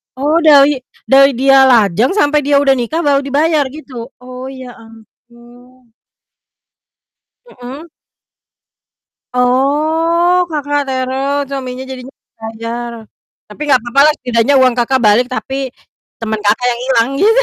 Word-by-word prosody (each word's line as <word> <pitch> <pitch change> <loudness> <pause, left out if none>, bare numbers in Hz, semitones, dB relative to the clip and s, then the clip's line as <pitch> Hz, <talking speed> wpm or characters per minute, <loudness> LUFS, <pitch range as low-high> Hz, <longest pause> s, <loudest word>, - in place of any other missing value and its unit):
Oh 295 +5 0
dari 290 -3 +5 0.3
dari 275 +1 +5
dia 270 +1 +4
lajang 225 - +2
sampai 300 -6 +2
dia 285 0 +2
udah 275 -1 +3
nikah 310 +8 -2
baru 285 -2 +2
dibayar 300 +2 +1
gitu? 260 -5 -10
Oh 255 +1 -9
ya 260 -2 -10
ampun. 240 +2 -20 1.6
Mhm. 270 - -11 1.5
Oh, 320 +8 +1
Kakak 290 -2 -2
teror 265 +2 -2
suaminya 260 -1 -5
jadinya 260 +1 -10 0.3
bayar, 230 +2 -6 0.6
tapi 250 - -13
nggak 265 -3 +4
apa-apa 240 +3 -1
lah, - - +4
setidaknya 245 +2 0
uang 260 -1 +4
Kakak 260 +2 +1
balik 215 +3 +4
tapi 265 +1 -5 0.6
teman 220 -1 -3
Kakak 210 +4 0
yang 235 - -5
hilang 235 -3 +2
gitu. 450 +5 +3
260 Hz, 125 wpm, -14 LUFS, 240-285 Hz, 1.6 s, dari